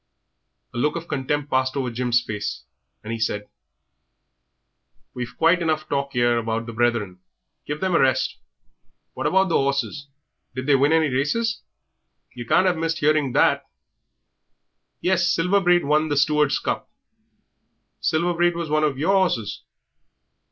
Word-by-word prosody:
A - - -4
look 150 +6 +1
of 170 0 -5
contempt 145 +1 -2
passed 130 +1 +1
over 130 -3 -2
Jim's 120 0 +1
face, 105 -1 -5 0.4
and 110 +2 -5
he 115 - -4
said 105 -2 -2 1.7
"We've 125 0 -6
quite 170 +2 +3
enough 155 -2 -1
talk 140 -1 -2
'ere 120 -1 +2
about 115 0 -2
the 115 - -7
Brethren; 110 -5 0 0.5
give 150 +1 -4
them 190 -1 0
a - - +4
rest. 130 0 +1 0.8
What - - -2
about 190 0 +3
the 165 - +3
'orses? 140 0 -2 0.5
Did 130 0 -4
they 145 - +3
win 140 +3 +3
any 160 -2 +3
races? 185 - -1 0.7
Yer 120 -2 -7
can't 185 - +3
'ave 180 -3 +1
missed 165 -1 -2
'earing 150 -4 +2
that." - - +2 1.3
"Yes, 180 -1 +2
Silver 180 +5 +2
Braid 175 -2 +3
won 150 +2 +2
the 145 - 0
Stewards' 150 0 +3
Cup." - - -3 1.1
"Silver 170 +2 +1
Braid 175 0 +2
was 170 -3 -4
one 155 0 +2
of 145 -3 0
your 165 +8 +1
horses?" 150 - 0
145 Hz, 150 wpm, -23 LUFS, 125-165 Hz, 1.7 s, a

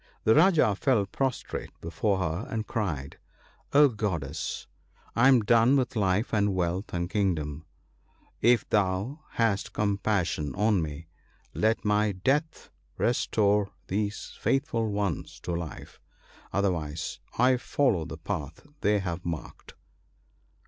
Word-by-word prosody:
" - - -36
The 110 - +5
Rajah 155 - +5
fell 120 -6 +2
prostrate 130 +6 -3
before 95 +4 -1
her, 90 +2 -2
and 110 -1 -2
cried, 80 - -3 0.2
— - - -30
* - - -36
O 145 +1 +7
Goddess! 90 - -3 0.5
I 120 +3 +5
am 130 -3 +6
done 115 +4 +4
with 130 -1 -1
life 100 +1 +1
and 100 -2 +2
wealth 90 +3 -1
and 85 -1 -2
kingdom! 80 -6 -1 0.7
If 120 -1 +4
thou 100 +7 0
hast 110 -4 0
compassion 100 -8 0
on 105 -2 +2
me, 80 +1 -5 0.5
let 110 +1 +1
my 105 0 +2
death 145 - -1 0.3
restore 105 -4 +2 0.2
these 105 +2 -3
faithful 120 -5 0
ones 100 -6 -2
to - - -4
life; 85 -2 -6 0.5
otherwise 85 -6 -2 0.2
I 125 +2 +4
follow 120 - +1
the 80 -1 -7
path 80 - -5
they 105 +1 +2
have 90 -2 -4
marked.' 85 -3 -6
100 Hz, 130 wpm, -28 LUFS, 85-115 Hz, 0.7 s, O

